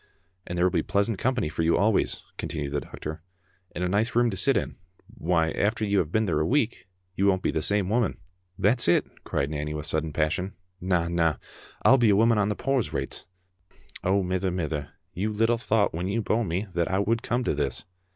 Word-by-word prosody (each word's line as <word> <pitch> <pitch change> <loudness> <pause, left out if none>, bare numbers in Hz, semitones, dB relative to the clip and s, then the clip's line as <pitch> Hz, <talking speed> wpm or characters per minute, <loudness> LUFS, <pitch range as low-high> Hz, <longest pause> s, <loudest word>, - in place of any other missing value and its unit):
" 90 +1 -37
And 90 - -4
there 90 - +3
will 90 - +3
be - - +1
pleasant 100 +1 0
company 125 -8 0
for 80 +2 -3
you 80 +1 +3
always," 105 0 +1
continued 70 -2 -4
the 75 - 0
doctor, 75 0 -7 0.5
"and 90 - -2
a - - +1
nice 105 +6 0
room 120 -1 +3
to - - -4
sit 135 +6 +3
in. - - -3 0.3
Why, 80 -1 0
after 110 +2 0
you 100 -1 +2
have 80 -2 -1
been 110 +2 +2
there 80 -6 0
a 75 - +1
week, 120 -6 0 0.3
you 100 - +2
won't 95 -1 +2
be - - +1
the 80 - -1
same 100 +2 +1
woman." 110 +1 +1 0.4
"That's 115 +5 +3
it!" 85 - +4 0.2
cried 70 +2 -1
Nanny 75 0 -3
with 75 -1 -4
sudden 80 0 -1
passion. 80 +6 -1 0.3
"Na, 90 -2 +1
na; 85 -2 +1 0.5
I'll 135 - +6
be 115 -2 +4
a 100 - +5
woman 115 +1 +4
on 100 0 +2
the 105 - -1
poor's 135 -1 0
rates. - - -4 0.8
Oh, 95 +1 +2
mither, 95 +1 0
mither, 80 -5 -3 0.2
you 105 +4 -1
little 115 +2 +2
thocht 110 -1 +1
when 85 +3 -2
you 110 +3 -1
bore 115 +3 +1
me 90 +4 -2
that 85 -1 0
I 95 - +1
would 115 +3 +1
come 120 +3 -1
to - - 0
this!" 70 -2 -2
95 Hz, 220 wpm, -26 LUFS, 85-110 Hz, 0.8 s, I'll